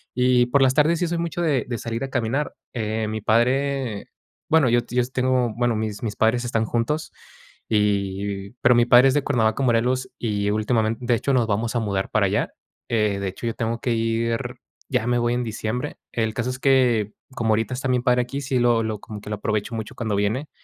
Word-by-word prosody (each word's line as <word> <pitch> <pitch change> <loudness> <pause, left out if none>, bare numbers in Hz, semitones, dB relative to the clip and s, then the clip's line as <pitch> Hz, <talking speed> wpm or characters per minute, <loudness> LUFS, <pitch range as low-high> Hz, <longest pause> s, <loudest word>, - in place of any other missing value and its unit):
y 125 -1 +3
por 140 +3 +2
las 130 0 +4
tardes 155 +3 +3
sí 175 - 0
soy 170 0 -2
mucho 170 +1 -3
de 140 -8 +1
de 120 - -2
salir 115 +3 -4
a 135 - -4
caminar, 130 +5 -1 0.2
eh, 110 -1 -2
mi 110 0 -4
padre, 125 0 +1 0.4
bueno, 160 -4 +4
yo 120 +1 +4
si - - -8
yo 125 - +4
si 125 - -8
tengo, 125 -3 +1
bueno, 120 -1 +1
mis 105 -2 -3
mis 105 -2 -3
padres 115 +2 +2
están 115 -2 0
juntos. 120 +8 -1 0.6
Y 100 -2 0
y - - -15
pero - - +5
mi 120 0 +4
padre 125 +2 +7
es - - +1
de 145 - +2
Cuernavaca, 115 -3 +1
Morelos, 125 +1 +1
y 105 -3 -1
últimamente, 110 +2 0
de 120 - +2
hecho, 140 +4 -1
nos 125 -3 +3
vamos 110 +3 -1
a - - +2
mudar 100 -2 -2
para - - +3
allá. - - -1 0.4
Eh, 105 -3 +1
de 100 - -2
hecho, 95 - -8
yo 115 - -1
tengo 115 -1 -2
que 120 - -1
ir 115 0 0 0.5
ya 110 - +1
me 120 0 +2
voy 120 0 +1
en 125 - -1
diciembre, 110 +2 -4
el 110 -2 -1
caso 125 +2 -2
es 125 - -5
que, 125 -6 +3 0.2
como 115 -2 0
ahorita 110 +4 0
está 135 +1 -3
mi 125 -1 +2
padre 125 0 +2
aquí, 135 +3 -5
sí 135 -2 -1
lo 120 -1 +3
lo 110 -2 -3
como 105 -1 -9
que - - -9
lo 105 - -1
aprovecho 110 +2 -2
mucho 110 -2 -5
cuando 110 -4 -2
viene, 110 +9 -1
115 Hz, 225 wpm, -23 LUFS, 110-125 Hz, 0.6 s, padre